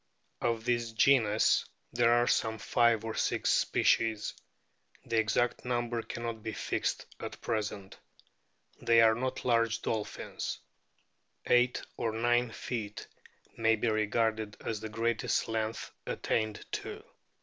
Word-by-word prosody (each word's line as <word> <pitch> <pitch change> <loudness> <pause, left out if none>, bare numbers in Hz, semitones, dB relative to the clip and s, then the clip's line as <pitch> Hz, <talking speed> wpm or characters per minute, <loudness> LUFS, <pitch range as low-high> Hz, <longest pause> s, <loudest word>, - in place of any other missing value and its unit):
Of 115 -1 0
this 120 -2 0
genus 110 -3 +4 0.3
there 120 -1 +4
are 120 0 +4
some 110 -2 +1
five 115 +2 +2
or 110 - -3
six - - +1
species; 110 -2 +2 0.7
the 115 -1 +1
exact 110 +2 +1
number 120 -1 -1
cannot 115 0 -5
be 110 0 -4
fixed - - -2
at - - -7
present. 105 -3 -3 0.8
They 115 -1 +5
are 110 -1 +6
not 130 +3 -3
large 115 -2 +2
dolphins. 110 -2 -3 0.9
Eight 125 0 +3
or 115 -2 -1
nine 120 +2 +2
feet 110 -2 -5 0.5
may 115 0 +3
be 110 +1 0
regarded 110 0 0
as 110 -2 -2
the 110 +1 -6
greatest 115 +1 0
length 110 0 -3 0.2
attained 110 -2 -1
to. - - -5
115 Hz, 125 wpm, -31 LUFS, 110-120 Hz, 0.9 s, are